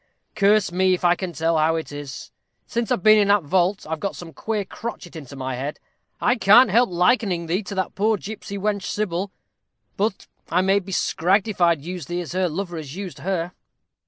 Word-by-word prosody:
Curse 205 -2 +3
me 185 +1 +3
if 180 - -5
I 175 - +6
can 180 0 -4
tell 165 +1 +1
how 160 +1 +3
it 160 -2 -4
is; 145 -2 -8 0.3
since 235 -2 -2
I've 180 - 0
been 215 0 +7
in 205 - +3
that 200 -2 +4
vault, 185 +5 +1
I've 160 0 -3
got 200 - -3
some 165 -2 -10
queer 215 -2 -3
crotchet 195 -4 -7
into 140 -3 -9
my 130 -1 -4
head. 135 +4 -4 0.4
I 245 - +2
can't 220 +2 +6
help 235 +2 +4
likening 180 -1 +2
thee 175 +5 0
to 200 0 -7
that 190 -1 -2
poor 215 +2 +1
gipsy 200 0 -7
wench, 200 0 -1
Sybil; 195 -2 -2 0.7
but 205 0 -1 0.3
may 190 +3 +3
I - - +3
be 195 0 -10
scragged 190 +3 +1
if 205 -4 -5
I'd 170 -4 +3
use 180 -4 -6
thee 175 +1 -2
as 170 - -7
her 185 0 0
lover 175 +1 -4
has 150 -2 -7
used 185 -7 -7
her. 175 +1 -2
185 Hz, 210 wpm, -23 LUFS, 165-200 Hz, 0.7 s, been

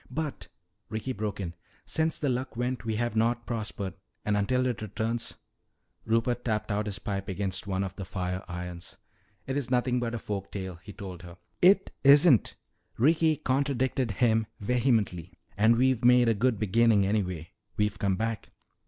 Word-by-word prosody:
"But," 155 -2 -4 0.4
Ricky 110 +4 -3
broke 105 -1 -4
in, 85 -4 -4 0.3
"since 160 0 +1
the 145 - -1
Luck 125 -2 -2
went 125 0 -2
we 110 -1 -1
have 120 0 -1
not 120 +2 +1
prospered. 105 -5 -4 0.3
And 105 - +1
until 125 +5 +1
it 120 -5 -1
returns 110 +3 -2 0.3
" - - -45
Rupert 115 +2 +1
tapped 110 -2 -1
out 105 +1 -1
his 100 -1 -3
pipe 100 -1 -4
against 95 +1 -3
one 95 0 0
of 95 -1 -5
the 100 - -4
fire 90 0 -3
irons. 90 0 -7 0.5
"It's 135 -1 -2
nothing 125 0 +2
but 120 -1 -2
a - - -1
folk 100 -2 -5
tale," 95 -4 -5
he 105 - -10
told 95 -4 -8
her. 85 0 -11 0.2
"It 190 +2 +5
isn't!" 140 -2 +6 0.4
Ricky 155 +4 +3
contradicted 130 -2 0
him 110 0 +2
vehemently. 110 - 0 0.2
"And 110 +3 +5
we've 130 0 +2
made 125 0 +6
a - - +4
good 115 +2 +1
beginning 110 0 +3
anyway. 90 -5 -1 0.3
We've 105 0 0
come 100 -2 +1
back." 110 +2 -3
110 Hz, 170 wpm, -28 LUFS, 100-125 Hz, 0.5 s, isn't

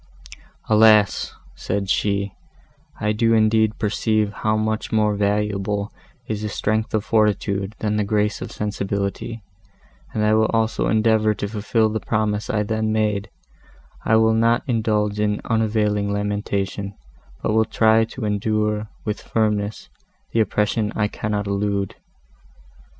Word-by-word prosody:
"Alas!" 110 -2 +4 0.2
said 100 0 -3
she, 100 0 0 0.7
"I 105 - +1
do 115 +1 +2
indeed 110 0 +3
perceive 105 0 0
how 110 0 0
much 110 0 -2
more 105 -1 +2
valuable 100 0 -1 0.3
is 110 -2 -3
the 105 - -3
strength 110 +2 -1
of 110 0 -1
fortitude 105 -2 +1
than 105 -1 -1
the 105 - +1
grace 105 0 0
of - - -6
sensibility, 100 +1 -3 0.7
and 105 -1 0
I 105 - +3
will 110 0 +4
also 115 0 0
endeavour 110 -1 +3
to 100 - -3
fulfil 110 +1 +1
the 110 +1 -2
promise 105 -1 -1
I 105 -1 +1
then 110 +1 -1
made; 105 -2 0 0.7
I 110 - +3
will 110 0 +4
not 115 +1 +2
indulge 105 -4 0
in 105 0 +1
unavailing 105 -2 +1
lamentation, 100 -1 -2 0.5
but - - +1
will 110 0 +4
try 110 0 +3
to 115 0 -6
endure, 105 +1 0 0.2
with 105 0 -3
firmness, 105 -1 -1 0.4
the 115 - +1
oppression 105 0 +1
I 105 -1 +1
cannot 105 -1 -2
elude." 100 -1 -1
105 Hz, 135 wpm, -22 LUFS, 105-110 Hz, 0.7 s, Alas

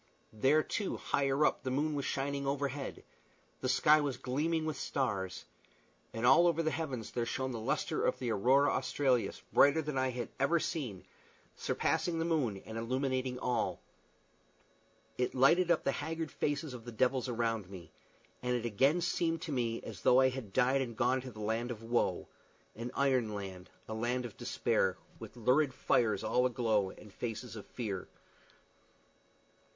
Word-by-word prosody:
There, 135 +8 +3
too, 205 - -2
higher 140 +1 +1
up, - - +1
the 130 - -3
moon 145 +4 0
was 140 -2 -2
shining 140 0 -2
overhead, 140 0 -3 0.6
the 130 - -2
sky 150 +4 +5
was 140 -4 -2
gleaming 155 +6 -1
with 155 -2 -2
stars; 105 -9 -2 0.7
and 115 +1 -2
all 135 +8 +7
over 165 -1 +2
the 160 - +1
heavens 135 -10 -4
there 120 - -1
shone 130 0 -2
the 115 - -4
lustre 110 - -1
of - - +1
the 125 -3 -2
aurora 130 +7 +4
australis, 130 -2 0
brighter 145 +3 +6
than 145 -3 -2
any 130 - +2
I - - -1
had 125 -2 -4
ever 160 +5 +3
seen 125 - -4 0.5
surpassing 170 -2 0
the 165 - 0
moon 130 - 0
and 110 +1 -5
illuminating 130 +1 -1
all. 125 -2 -1 1.4
It 125 - 0
lighted 165 +8 +5
up 170 - +3
the 140 - +2
haggard 160 +2 -4
faces 145 -1 -2
of 120 -2 -8
the 120 - -7
devils 130 +3 +1
around 115 -4 -1
me, 95 -3 -10 0.5
and 125 0 0
it 120 -1 -2
again 135 - +3
seemed 165 -1 0
to 160 - -4
me 115 -4 -1
as - - -8
though 125 - +5
I 130 0 +5
had 125 -6 -6
died 130 +4 +3
and 120 -4 -4
gone 130 +2 +2
to 130 - -7
the 110 -3 -10
land 110 +3 -1
of 115 -2 -6
woe 120 +1 0 0.5
an 115 +3 -5
iron 130 -6 +1
land, 95 -2 -7 0.2
a 110 - -5
land 120 +3 -1
of 115 - -8
despair, - - 0 0.2
with - - -10
lurid 130 +4 +2
fires 110 -7 +2
all 125 +3 +2
aglow 110 -5 +1
and 105 +1 -13
faces 115 0 -5
of 105 - -9
fear. 100 -6 -4
130 Hz, 175 wpm, -33 LUFS, 115-140 Hz, 1.4 s, all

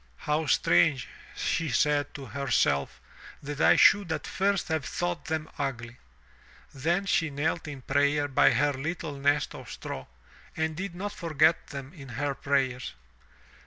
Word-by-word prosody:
"How 150 +1 -1
strange," 130 +5 +3 0.3
she 165 -2 -1
said 145 +3 +1
to 140 - -7
herself, 125 - 0 0.4
that 145 +2 -4
I - - +6
should 200 -5 +5
at 160 - -2
first 195 -1 0
have 160 -2 0
thought 175 +4 -3
them 160 -1 -2
ugly." 120 -4 -4 0.8
Then 170 +8 0
she 165 -4 +1
knelt 155 +4 -2
in 140 -3 -8
prayer 145 +2 +2
by 135 - +5
her 145 +4 +2
little 155 +3 -4
nest 145 +1 +1
of - - -10
straw, 65 - -7 0.5
and 160 0 -1
did 185 +1 -5
not 200 +3 -4
forget 160 -4 +2
them 140 +1 -8
in 140 -6 -11
her 140 +4 -2
prayers. 130 - -1
145 Hz, 150 wpm, -28 LUFS, 135-160 Hz, 0.8 s, I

